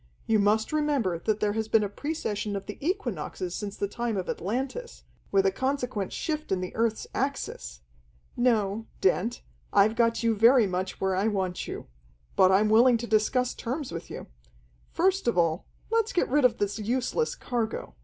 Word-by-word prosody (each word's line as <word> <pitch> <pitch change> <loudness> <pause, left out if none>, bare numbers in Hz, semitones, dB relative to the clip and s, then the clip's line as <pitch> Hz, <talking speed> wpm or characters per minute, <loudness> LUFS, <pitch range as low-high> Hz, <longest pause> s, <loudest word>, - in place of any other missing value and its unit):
You 220 -1 +3
must 215 +5 +2
remember 280 - +1
that 215 +3 -1
there 205 -1 +1
has 220 0 -2
been 220 -1 +3
a - - 0
precession 210 -4 -3
of 195 0 -4
the 205 - -8
equinoxes 230 - -3
since 205 0 -5
the 200 - -1
time 235 0 -2
of 185 - -3
Atlantis, 265 - -4 0.3
with 195 -1 +3
a 195 - +4
consequent 250 -3 -2
shift 310 -2 -3
in 190 - +2
the 185 0 -5
earth's 225 -1 0
axis. 60 - -3 0.5
No, 225 -3 +1
Dent, 205 +6 +1 0.3
I've 205 +2 +4
got 230 0 +2
you 230 -1 +3
very 230 +3 +6
much 185 0 -3
where 190 -1 +1
I 195 +3 +1
want 190 -4 -2
you. - - -6 0.5
But 185 0 +5
I'm 200 +3 +4
willing 235 +3 +6
to 235 - -5
discuss 235 +3 +1
terms 260 +3 -4
with 165 - -6
you. - - -7 0.6
First 380 0 +1
of 235 - +2
all, 165 0 +1 0.2
let's 455 0 +1
get 355 - +2
rid 285 +1 +3
of 250 - +3
this 205 +2 -1
useless 255 - -1
cargo. 230 - -3
220 Hz, 180 wpm, -27 LUFS, 195-255 Hz, 0.6 s, very